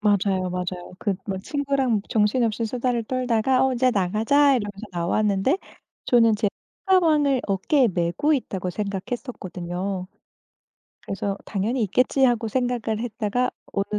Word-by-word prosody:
맞아요, 195 -3 +2
맞아요. 180 0 -5
그 200 -3 0
뭐 195 -1 -2
친구랑 270 -1 0
정신없이 225 0 +1
수다를 240 0 -1
떨다가 255 +1 +1
"어 265 - +2
이제 255 +1 +3
나가자." 225 +9 +3
이러면서 205 -1 -5
나왔는데 195 - +1 0.5
저는 230 -3 +5
제 210 -1 +1 0.4
손가방을 305 -8 +4
어깨에 230 +7 +2
메고 175 - 0
있다고 190 - -2
생각했었거든요. 190 -3 -4 0.9
그래서 195 0 -3
'당연히 225 +5 -1
있겠지.' 250 +6 +2
하고 240 -3 +2
생각을 240 -2 -1
했다가 235 +1 -1 0.2
어느 200 +1 -1
220 Hz, 325 characters per minute, -24 LUFS, 195-255 Hz, 0.9 s, 저는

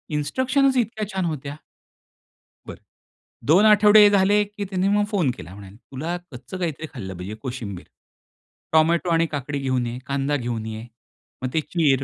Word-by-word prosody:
इन्स्ट्रक्शनच 260 - +1
इतक्या 220 -3 -1
छान 190 -2 -1
होत्या. 145 -3 -4 1.1
बरं. - - -10 0.7
2 180 +8 +6
आठवडे 210 0 +7
झाले 205 +1 +4
की 205 0 -6
त्यांनी 190 0 -1
मग 205 - +2
फोन 175 -10 +1
केला 85 +4 -10
म्हणाले, 100 0 -12
"तुला 145 +9 -5
कच्चं 125 +7 -8
काहीतरी 160 -3 -3
खाल्लं 95 -8 -6
पाहिजे 95 +4 -6
कोशिंबीर. 120 -8 -6 0.9
टोमॅटो 165 +2 +3
आणि 165 0 +3
काकडी 145 -1 -4
घेऊन 130 -2 0
ये, 120 - -5
कांदा 140 +1 -1
घेऊन 120 -4 -3
ये. 110 +1 -6 0.6
मग 130 - -2
ते 160 - +2
चीर." 145 -5 +1
155 Hz, 155 wpm, -23 LUFS, 125-195 Hz, 1.1 s, आठवडे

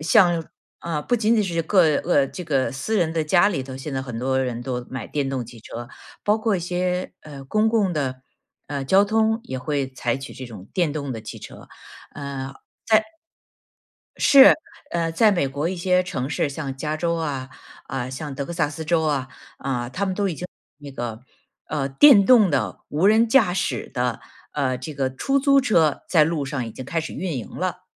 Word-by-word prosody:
像 175 +1 +4
像 - - -21 0.3
呃， 160 -3 -3
不 245 - 0
仅 225 0 +2
仅 215 - +2
是 170 -3 -1
个 165 -4 +4
呃， 145 -5 +2
这 180 - -7
个 140 -3 0
私 180 +12 -2
人 170 -5 +1
的 160 - 0
家 175 +5 +4
里 150 -9 -2
头 130 0 -8
现 135 +2 -6
在 130 - -1
很 125 -4 -6
多 130 +1 0
人 120 -2 -3
都 125 -1 -4
买 130 -4 -5
电 140 -2 -2
动 130 -2 -2
汽 115 0 -13
车， 120 +2 -8 0.4
包 210 +1 +3
括 215 -3 +1
一 - - -4
些， 180 +1 -2
呃， 140 -3 -10
公 215 +10 +2
共 210 -5 +2
的， 130 -4 -3 0.5
呃， 140 -2 -3
交 195 +7 +5
通 220 +1 +1
也 130 - -5
会 140 0 -2
采 125 -2 -2
取 135 +1 -8
这 130 - -8
种 105 -4 -11
电 170 -5 +1
动 140 -3 -4
的 115 - -6
汽 110 - -8
车。 - - -12 0.5
嗯， 140 -1 -5
在 135 - -15 1.6
是， 275 -1 +8 0.4
呃， 165 -1 -1
在 215 +6 +5
美 175 -8 +1
国 145 +5 -2
一 185 - -3
些 180 +1 +2
城 135 -8 -4
市， 150 - 0
像 140 -1 -5
加 150 +2 -2
州 170 +1 0
啊， 140 -5 -3 0.4
啊， 130 -2 -4
像 140 +2 -6
德 140 - -3
克 - - -5
萨 155 -4 0
斯 155 +2 -7
州 165 0 +2
啊， 140 -4 0 0.3
啊， 125 -3 -3
他 200 +9 -2
们 190 - -1
都 200 +1 0
已 175 - -3
经 180 - -6 0.3
那 145 -2 -10
个， 120 -3 -5 0.5
啊， 150 -3 -2
电 200 - +7
动 225 -7 +6
的， 130 -7 -1
无 160 +7 +1
人 220 +2 +5
驾 220 -7 +4
驶 180 - -2
的， 125 -2 -1 0.3
呃， 130 -3 0
这 130 +4 -7
个 135 -2 -2
出 270 - +1
租 275 0 +4
车 165 - +2
在 160 -4 +5
路 155 -2 -1
上 130 -2 -3
已 115 - -7
经 130 - -8
开 165 - -1
始 160 - -6
运 180 -6 -3
营 115 - -7
了。 - - -4
150 Hz, 225 characters per minute, -23 LUFS, 130-180 Hz, 1.6 s, 是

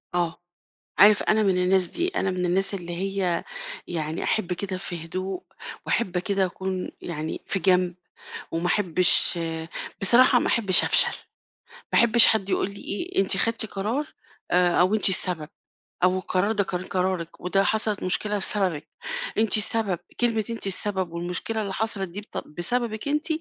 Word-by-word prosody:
آه. 170 -1 -1 0.6
عارف، 205 +1 +7
أنا 215 0 +2
من 190 -3 +2
الناس 185 -1 +3
دي، 345 +1 -1
أنا 195 - -1
من 180 -1 -2
الناس 190 +3 +1
اللي 175 -2 -5
هي 190 -1 -1 0.4
يعني 160 -1 -3
أحِب 185 -4 0
كده 190 +1 -4
في 175 -3 -6
هدوء 185 +2 -5 0.4
وأحِب 185 -6 0
كده 195 +1 0
أكون 185 0 -4
يعني 160 -2 -5
في 195 - 0
جنب 180 0 +2 0.6
وما 165 +2 -1
أحبّش 180 -2 +3 0.6
بصراحة 245 +5 +6
ما - - -1
أحبّش 200 -5 +4
أفشل، - - +3 0.8
ما - - +6
أحبّش 235 0 +7
حد 200 -3 +2
يقول 195 - 0
لي - - -10
إيه، 340 - -2
أنتِ 195 0 +2
خدتِ 230 +1 +1
قرار 220 +9 -3 0.5
آآ 180 -1 +3
أو 190 +4 +3
أنتِ 205 - +2
السبب 175 -4 +1 0.6
أو 185 +1 +3
القرار 185 +2 0
ده 205 -2 +1
كان 180 -1 -4
قرارِك 185 -3 -3
وده 195 +2 +1
حصلِت 215 -1 0
مشكلة 205 +4 0
بسببِك، 190 -6 0 0.5
أنتِ 220 0 +3
السبب، 210 -4 0 0.2
كلمة 225 -3 +1
أنتِ 230 -3 -4
السبب 190 -2 0
والمشكلة 180 +6 -2
اللي 200 -2 -4
حصلِت 205 -2 -1
دي 190 +4 -7
بت 210 - -7
بسببِك 220 - -2
أنتِ، 300 +1 -1
190 Hz, 160 wpm, -24 LUFS, 180-215 Hz, 0.8 s, عارف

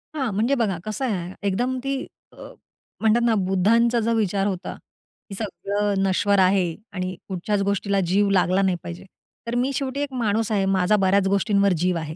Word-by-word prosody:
हां. 265 -6 -1
म्हणजे 230 +8 +1
बघा 215 -8 0
कसं 215 +5 -3
आहे, 185 -6 -3
एकदम 245 +7 0
ती, 275 0 -2 0.3
अ, - - -21 0.7
म्हणतात 225 +2 +3
ना 230 -2 +3
बुद्धांचा 230 +6 +3
जर 230 +1 0
विचार 200 -2 0
होता, 190 -1 -4 0.6
की 195 - -6
सगळं 205 0 -2
नश्वर 195 +1 +2
आहे 185 -3 +2 0.2
आणि 185 -1 -3
कुठच्याच 195 +2 -2
गोष्टीला 200 0 0
जीव 200 +3 +2
लागला 185 0 +2
नाही 190 -2 +2
पाहिजे. 175 +2 -8 0.4
तर 235 - -2
मी 255 +3 +1
शेवटी 270 +1 -3
एक 285 -2 -3
माणूस 225 -2 0
आहे, 200 -2 +1
माझा 195 +1 +2
बऱ्याच 195 0 +2
गोष्टींवर 200 0 +2
जीव 180 +1 0
आहे. 155 -1 -5
200 Hz, 180 wpm, -23 LUFS, 190-225 Hz, 0.7 s, म्हणतात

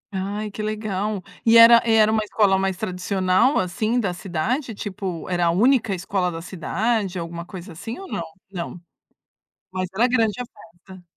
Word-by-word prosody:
Ai 205 +3 -3
que 215 - -6
legal. 210 -2 -3 0.2
E 230 0 +6
era 230 0 +9
era 220 -2 +4
uma 220 -1 +1
escola 205 -2 +2
mais 190 -1 -1
tradicional 185 +4 +1
assim 215 +6 0
da 195 -6 -1
cidade 205 - -3
tipo, 190 -4 -5
era 175 -2 +1
a - - +4
única 225 +2 +3
escola 180 0 -1
da 165 - -6
cidade, 195 +3 -2
alguma 170 0 -5
coisa 185 0 -9
assim 225 +8 -7
ou 390 - -9
não? - - -3 0.3
Não, 175 -1 -6 0.9
mas 185 0 -2
era 235 +5 +3
grande 225 -4 +2
a - - -2
festa. 180 -2 -16
195 Hz, 165 wpm, -23 LUFS, 180-220 Hz, 0.9 s, era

